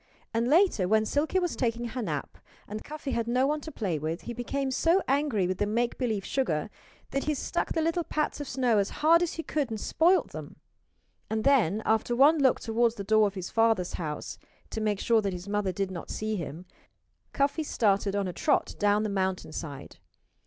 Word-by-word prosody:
And 230 Hz, +1 st, +1 dB
later, 310 Hz, -, +4 dB
when 215 Hz, +2 st, +3 dB
Silkie 295 Hz, -, 0 dB
was 355 Hz, -3 st, 0 dB
taking 235 Hz, -1 st, -1 dB
her 250 Hz, +2 st, -4 dB
nap, 155 Hz, -9 st, -4 dB, 0.3 s
and 215 Hz, +1 st, -6 dB
Cuffy 300 Hz, -2 st, -6 dB
had 230 Hz, -2 st, -1 dB
no 250 Hz, +2 st, +2 dB
one 300 Hz, +2 st, 0 dB
to 315 Hz, -, -8 dB
play 185 Hz, -, -2 dB
with, 160 Hz, +3 st, -3 dB
he 240 Hz, -, -6 dB
became 265 Hz, +3 st, -2 dB
so 335 Hz, +8 st, +3 dB
angry 275 Hz, -8 st, +1 dB
with 185 Hz, +1 st, -2 dB
the 205 Hz, -, +1 dB
make 235 Hz, +3 st, -1 dB
believe 220 Hz, -6 st, -1 dB
sugar 200 Hz, -, -1 dB, 0.4 s
that 275 Hz, -, -1 dB
he 300 Hz, 0 st, 0 dB
struck -, -, -2 dB
the 320 Hz, -, 0 dB
little 330 Hz, +2 st, 0 dB
pats 305 Hz, -2 st, -2 dB
of 290 Hz, -, -5 dB
snow 245 Hz, -4 st, +2 dB
as 200 Hz, -, 0 dB, 0.2 s
hard 335 Hz, +2 st, +7 dB
as 350 Hz, -, 0 dB
he 325 Hz, -, -5 dB
could 295 Hz, -5 st, -1 dB
and 220 Hz, -1 st, -4 dB
spoiled 350 Hz, -, +2 dB
them. -, -, -8 dB, 0.7 s
And 220 Hz, 0 st, -1 dB
then, 220 Hz, -, +3 dB
after 225 Hz, +2 st, +1 dB
one 295 Hz, +5 st, +6 dB
look 265 Hz, -3 st, +4 dB
toward 230 Hz, 0 st, +1 dB
the 200 Hz, -, -4 dB
door 215 Hz, +1 st, +4 dB
of 200 Hz, -, -6 dB
his 185 Hz, -2 st, -5 dB
father's 225 Hz, -6 st, +2 dB
house 155 Hz, -4 st, -5 dB, 0.3 s
to 220 Hz, -, -3 dB
make 210 Hz, -2 st, 0 dB
sure 230 Hz, -2 st, +3 dB
that 200 Hz, -2 st, -2 dB
his 180 Hz, +2 st, -7 dB
mother 205 Hz, -2 st, 0 dB
did 190 Hz, +1 st, -2 dB
not 175 Hz, -3 st, -7 dB
see 215 Hz, 0 st, -2 dB
him 170 Hz, -1 st, -6 dB, 0.7 s
Cuffy 280 Hz, +3 st, +1 dB
started 205 Hz, -8 st, +1 dB
on 200 Hz, -1 st, 0 dB
a 180 Hz, -, -4 dB
trot 290 Hz, -, +1 dB
down 205 Hz, +1 st, +3 dB
the 215 Hz, -, -1 dB
mountainside. 180 Hz, -7 st, -4 dB
225 Hz, 210 wpm, -28 LUFS, 200-275 Hz, 0.7 s, hard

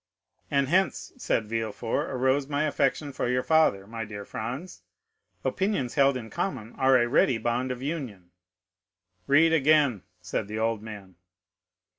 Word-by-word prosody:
"And 140 Hz, -1 st, +2 dB
hence," 180 Hz, 0 st, +1 dB
said 110 Hz, -, 0 dB
Villefort, 115 Hz, 0 st, -2 dB
"arose 130 Hz, +2 st, +1 dB
my 145 Hz, 0 st, 0 dB
affection 150 Hz, -1 st, 0 dB
for -, -, -2 dB
your 125 Hz, 0 st, +1 dB
father, 160 Hz, -12 st, +3 dB
my 115 Hz, +2 st, -5 dB
dear 105 Hz, -1 st, -7 dB
M. -, -, -10 dB
Franz. 130 Hz, +11 st, -6 dB, 0.6 s
Opinions 190 Hz, -, -1 dB
held 140 Hz, -2 st, +3 dB
in 110 Hz, -3 st, -8 dB
common 130 Hz, -, -3 dB
are 130 Hz, 0 st, +4 dB
a 120 Hz, -1 st, +2 dB
ready 130 Hz, -1 st, +3 dB
bond 120 Hz, +3 st, -1 dB
of 125 Hz, 0 st, -5 dB
union." 125 Hz, -, -5 dB, 1.0 s
"Read 160 Hz, +4 st, +5 dB
again," 145 Hz, -, +3 dB, 0.2 s
said -, -, -3 dB
the 105 Hz, +1 st, -5 dB
old 110 Hz, -1 st, 0 dB
man. 100 Hz, -5 st, -10 dB
130 Hz, 150 wpm, -27 LUFS, 110-145 Hz, 1.0 s, Read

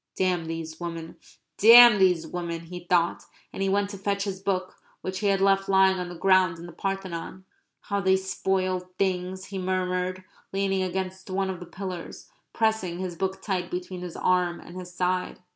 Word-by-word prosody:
"Damn 180 Hz, -3 st, 0 dB
these 160 Hz, -1 st, -6 dB
women 165 Hz, -1 st, -6 dB, 0.4 s
damn 235 Hz, 0 st, +9 dB
these 180 Hz, -4 st, +3 dB
women!" 170 Hz, 0 st, -4 dB
he 175 Hz, +1 st, -9 dB
thought. 175 Hz, -1 st, +2 dB, 0.3 s
And -, -, -5 dB
he 195 Hz, -, +1 dB
went 200 Hz, +1 st, +1 dB
to 200 Hz, -, -8 dB
fetch 200 Hz, 0 st, -1 dB
his 195 Hz, -2 st, -4 dB
book 185 Hz, -1 st, -2 dB, 0.2 s
which 185 Hz, 0 st, -4 dB
he 205 Hz, -, 0 dB
had 195 Hz, -1 st, +3 dB
left 195 Hz, 0 st, +3 dB
lying 190 Hz, -1 st, +4 dB
on 180 Hz, -1 st, -4 dB
the 175 Hz, -, -8 dB
ground 185 Hz, -2 st, +3 dB
in 170 Hz, -, -9 dB
the 175 Hz, -, -9 dB
Parthenon. 190 Hz, 0 st, -5 dB, 0.4 s
"How 200 Hz, -1 st, -2 dB
they 190 Hz, -1 st, +4 dB
spoil 190 Hz, -1 st, -1 dB, 0.2 s
things," 185 Hz, 0 st, -1 dB
he 195 Hz, -1 st, -6 dB
murmured, 185 Hz, 0 st, -1 dB, 0.3 s
leaning 195 Hz, -1 st, 0 dB
against 190 Hz, +1 st, -4 dB
one 190 Hz, 0 st, -1 dB
of 185 Hz, -, -7 dB
the 180 Hz, -, -9 dB
pillars, 185 Hz, -3 st, -7 dB, 0.2 s
pressing 220 Hz, -6 st, 0 dB
his 180 Hz, -1 st, -4 dB
book 190 Hz, +2 st, -3 dB
tight 185 Hz, -3 st, -2 dB
between 180 Hz, 0 st, -5 dB
his 180 Hz, -2 st, -7 dB
arm 180 Hz, -1 st, +1 dB
and 175 Hz, -, -12 dB
his 180 Hz, -1 st, -8 dB
side. 180 Hz, 0 st, -1 dB
185 Hz, 185 wpm, -26 LUFS, 180-195 Hz, 0.4 s, damn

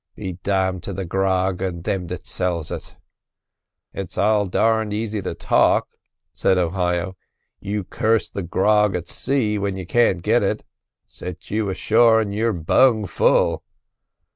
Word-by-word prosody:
Be 95 Hz, -3 st, -6 dB
damned 95 Hz, -2 st, 0 dB
to 100 Hz, -, -4 dB
the 95 Hz, 0 st, -4 dB
grog 95 Hz, 0 st, 0 dB
and 90 Hz, -3 st, -3 dB
thim 90 Hz, -2 st, -2 dB
that -, -, -7 dB
sells 85 Hz, -4 st, -2 dB
it!" -, -, -7 dB, 1.0 s
"It's 95 Hz, -3 st, -6 dB
all 105 Hz, 0 st, +2 dB
darned 110 Hz, +2 st, +1 dB
easy 110 Hz, -1 st, -2 dB
to -, -, -4 dB
talk," -, -, +2 dB, 0.4 s
said 95 Hz, -1 st, +2 dB
Ohio. 90 Hz, 0 st, -1 dB, 0.4 s
"You 100 Hz, 0 st, -3 dB
curse 110 Hz, +4 st, 0 dB
the 100 Hz, -, -5 dB
grog 105 Hz, +3 st, +2 dB
at 90 Hz, -1 st, -4 dB
sea 110 Hz, -7 st, 0 dB
when 100 Hz, -1 st, -2 dB
you 95 Hz, -, -6 dB
can't 95 Hz, -4 st, +2 dB
get -, -, +3 dB
it; -, -, -1 dB, 0.4 s
set 90 Hz, 0 st, -9 dB
you 105 Hz, -1 st, 0 dB
ashore, 110 Hz, +4 st, +4 dB
and 105 Hz, -2 st, -2 dB
you're 115 Hz, +2 st, +1 dB
bung 110 Hz, +6 st, +3 dB
full." 85 Hz, -, +2 dB
95 Hz, 150 wpm, -22 LUFS, 90-105 Hz, 1.0 s, ashore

